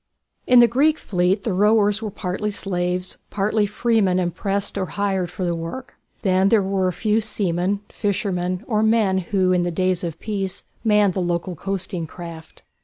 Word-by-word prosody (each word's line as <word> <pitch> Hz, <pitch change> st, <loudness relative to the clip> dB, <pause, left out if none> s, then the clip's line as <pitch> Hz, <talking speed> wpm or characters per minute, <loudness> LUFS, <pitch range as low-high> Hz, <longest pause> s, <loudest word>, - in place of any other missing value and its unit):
In 250 Hz, -1 st, +7 dB
the 240 Hz, -, +7 dB
Greek 290 Hz, +7 st, +3 dB
fleet 185 Hz, +1 st, 0 dB
the 220 Hz, -, -1 dB
rowers 210 Hz, +2 st, +3 dB
were 220 Hz, -, -3 dB
partly 195 Hz, +2 st, -3 dB
slaves, 180 Hz, -2 st, -2 dB
partly 210 Hz, +1 st, +1 dB
freemen 210 Hz, -3 st, +1 dB
impressed 195 Hz, +3 st, -1 dB
or 185 Hz, -, -2 dB
hired 195 Hz, -3 st, -1 dB
for 180 Hz, +1 st, -4 dB
the 175 Hz, -, 0 dB
work. 165 Hz, +11 st, -6 dB, 0.3 s
Then 190 Hz, -1 st, +3 dB
there 215 Hz, -2 st, +4 dB
were 190 Hz, -1 st, 0 dB
a -, -, +1 dB
few 215 Hz, +5 st, +1 dB
seamen, 195 Hz, -1 st, 0 dB
fishermen, 185 Hz, -2 st, -2 dB
or 215 Hz, -3 st, 0 dB
men 220 Hz, -4 st, +3 dB
who 185 Hz, 0 st, +1 dB
in 180 Hz, -1 st, +3 dB
the 175 Hz, -, 0 dB
days 185 Hz, +1 st, 0 dB
of 165 Hz, -2 st, -4 dB
peace 195 Hz, -3 st, -3 dB, 0.2 s
manned 210 Hz, -3 st, +3 dB
the 190 Hz, -, -1 dB
local 175 Hz, +1 st, -2 dB
coasting 185 Hz, -1 st, -4 dB
craft. 165 Hz, -1 st, -10 dB
195 Hz, 175 wpm, -22 LUFS, 180-210 Hz, 0.3 s, In